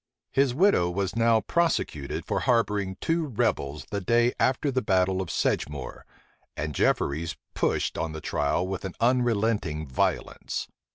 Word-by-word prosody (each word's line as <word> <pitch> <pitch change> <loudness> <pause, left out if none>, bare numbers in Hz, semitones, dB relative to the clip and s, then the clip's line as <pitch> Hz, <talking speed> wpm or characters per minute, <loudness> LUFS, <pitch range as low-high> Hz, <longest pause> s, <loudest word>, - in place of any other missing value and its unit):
His 135 -2 +2
widow 170 - +4
was 95 +2 -2
now 115 -1 +4
prosecuted 165 - -1
for - - -1
harboring 105 -5 +1
two 165 -1 0
rebels 75 - -1
the 100 -1 -2
day 120 +5 +3
after 135 +2 +2
the 130 0 0
battle 95 -3 +2
of 90 - -5
Sedgemoor; 70 -3 -2 0.5
and 75 0 -3
Jefferies 80 +4 0 0.2
pushed - - 0
on 80 - -2
the 80 - -6
trial 80 +4 0
with 95 -1 -4
an 95 -2 -5
unrelenting 115 -9 +1
violence. 65 -3 -2
100 Hz, 145 wpm, -27 LUFS, 80-120 Hz, 0.5 s, widow